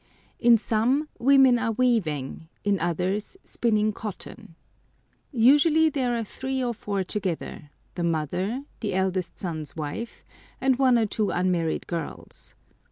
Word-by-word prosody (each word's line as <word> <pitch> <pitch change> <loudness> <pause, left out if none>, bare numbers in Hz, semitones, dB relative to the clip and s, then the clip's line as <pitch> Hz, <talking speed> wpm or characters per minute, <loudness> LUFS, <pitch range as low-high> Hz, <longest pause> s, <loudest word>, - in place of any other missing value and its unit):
In 235 -1 +6
some 235 +8 +1
women 265 -1 +5
are 225 0 0
weaving, 170 - 0 0.2
in 205 -2 +1
others 185 - -2
spinning 215 -2 0
cotton. 200 -5 -8 0.8
Usually 295 +6 +5
there 250 -4 0
are 230 - -1
three 265 +4 -3
or 240 -1 -1
four 200 -3 -3
together—the 175 -4 -5
mother, 175 - -1 0.2
the 205 -5 -2
eldest 190 -1 -1
son's 160 -5 -5
wife, 160 +9 -6 0.3
and 260 -1 +2
one 255 -3 +5
or 225 - +2
two 210 0 -1
unmarried 180 -3 0
girls. 170 -2 -7
215 Hz, 125 wpm, -25 LUFS, 180-250 Hz, 0.8 s, In